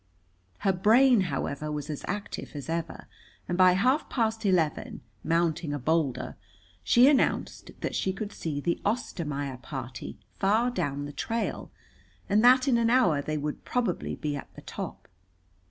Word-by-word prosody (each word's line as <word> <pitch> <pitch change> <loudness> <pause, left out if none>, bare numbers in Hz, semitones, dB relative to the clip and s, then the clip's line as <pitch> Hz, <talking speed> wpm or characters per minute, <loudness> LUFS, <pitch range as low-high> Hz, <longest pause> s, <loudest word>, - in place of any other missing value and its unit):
Her 195 - +2
brain, 230 +5 +5
however, 140 +2 -3
was 150 -1 -4
as 150 -3 -5
active 205 -6 -5
as 145 +1 -6
ever, 165 0 -3 0.4
and 175 - -1
by 185 0 +6
half 255 - +2
past 225 -3 0
eleven, 170 -6 0 0.2
mounting 165 -2 0
a - - -2
boulder, 150 -1 -1 0.5
she 240 - +6
announced 285 -2 +1
that - - -2
she 190 - 0
could 205 +2 -5
see 150 -3 -3
the 170 +4 -1
Ostermaier 145 - -2
party 130 -1 -7 0.2
far 220 +5 +2
down 145 - -2
the 145 - -7
trail, 230 +7 -3 0.6
and 210 +2 +3
that 255 +2 +6
in 240 -3 +4
an 230 0 +2
hour 235 - +4
they 155 +2 -3
would 150 0 -4
probably 245 -2 -1
be 150 -2 -3
at 140 - -8
the - - -11
top. - - -7
175 Hz, 155 wpm, -28 LUFS, 145-225 Hz, 0.6 s, by